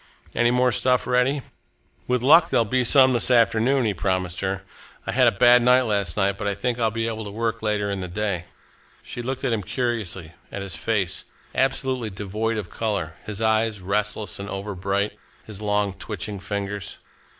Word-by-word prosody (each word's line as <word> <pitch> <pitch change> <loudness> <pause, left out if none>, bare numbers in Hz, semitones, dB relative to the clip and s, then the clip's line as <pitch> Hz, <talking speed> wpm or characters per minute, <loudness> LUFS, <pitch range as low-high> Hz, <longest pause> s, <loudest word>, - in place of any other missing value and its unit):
"Any 120 0 +3
more 125 +1 +3
stuff 125 +2 +2
ready?" 125 +2 +1 0.6
"With 125 -1 0
luck 165 +5 +7
there'll 115 - +3
be 125 +4 +1
some 130 +1 +6
this 120 - +1
afternoon," 120 +2 +3
he 105 - +1
promised 90 -1 -1
her. 95 0 -2 0.4
"I - - -2
had - - +4
a - - +5
bad 120 +4 +6
night 125 +1 +5
last 100 -6 -1
night, 100 -1 +1
but - - -2
I 100 - 0
think 120 +4 -2
I'll 115 -1 +2
be 115 +1 -2
able 110 -1 -3
to 105 - -6
work 115 +2 -2
later 105 -2 0
in 100 -1 -3
the 90 - -4
day." 95 -1 -2 0.6
She 120 - -6
looked 130 +2 -4
at 130 -3 +1
him 110 - 0
curiously, 105 -7 -3 0.2
at 95 - -5
his 95 -3 -5
face, 100 -6 -1 0.3
absolutely 130 -3 0
devoid 105 +3 -3
of 105 -5 -5
colour, 100 -8 -2
his 105 +1 -3
eyes, 110 -1 +2
restless 105 +1 -1
and 100 +1 -6
overbright, 100 0 -2 0.3
his 105 -2 -8
long, 105 -2 0
twitching 105 0 -6
fingers. 100 -1 -4
105 Hz, 185 wpm, -24 LUFS, 100-120 Hz, 0.6 s, luck